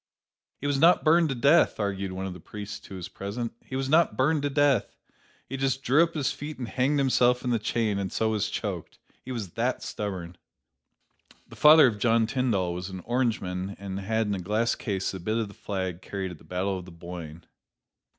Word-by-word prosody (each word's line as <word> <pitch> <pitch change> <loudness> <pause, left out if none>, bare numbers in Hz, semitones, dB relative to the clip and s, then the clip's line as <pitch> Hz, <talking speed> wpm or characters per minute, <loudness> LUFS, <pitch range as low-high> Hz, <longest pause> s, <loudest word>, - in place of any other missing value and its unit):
"He - - -7
was 145 -1 +1
not 170 +4 +5
burned 165 +1 +4
to 135 - -1
death," 140 +5 +4
argued 100 -2 -2
one 95 +1 -4
of 95 - -4
the 90 - -10
priests 105 +3 -8
who 95 - -8
was 90 -2 -6
present; 110 +4 -5
"he 130 - -7
was 135 0 -1
not 160 +4 +3
burned 145 +3 +2
to 145 - 0
death. 140 -5 +2 0.5
He 135 - -4
just 135 0 0
drew 140 +6 +4
up 165 0 +1
his 145 -4 0
feet 150 +1 -7
and 125 - -5
hanged 135 +5 +1
himself 125 -2 +3
in 125 - 0
the 115 - +2
chain, 105 -2 0
and 95 -2 -3
so 110 - +1
was 105 0 0
choked: 95 -7 -4 0.3
he 130 - -7
was 110 -7 -4
that 120 +5 -1
stubborn!" 90 -4 -5 1.1
The - - -13
father 155 0 +8
of 110 -5 +1
John 115 0 +3
Tyndall 110 -8 0
was 90 +2 -5
an 95 -1 -7
Orangeman 100 -5 -1
and 100 -1 -5
had 110 +3 0
in 105 - -1
a 95 - -2
glass 105 +6 +1
case 100 -4 -2
a 95 - -5
bit 110 +6 -1
of 110 -3 -1
the - - -12
flag 95 -4 -4
carried 95 -1 -4
at 85 - -11
the - - -18
Battle 95 +1 -2
of 90 - -10
the 90 - -12
Boyne. 85 -1 -9
110 Hz, 220 wpm, -27 LUFS, 95-130 Hz, 1.1 s, father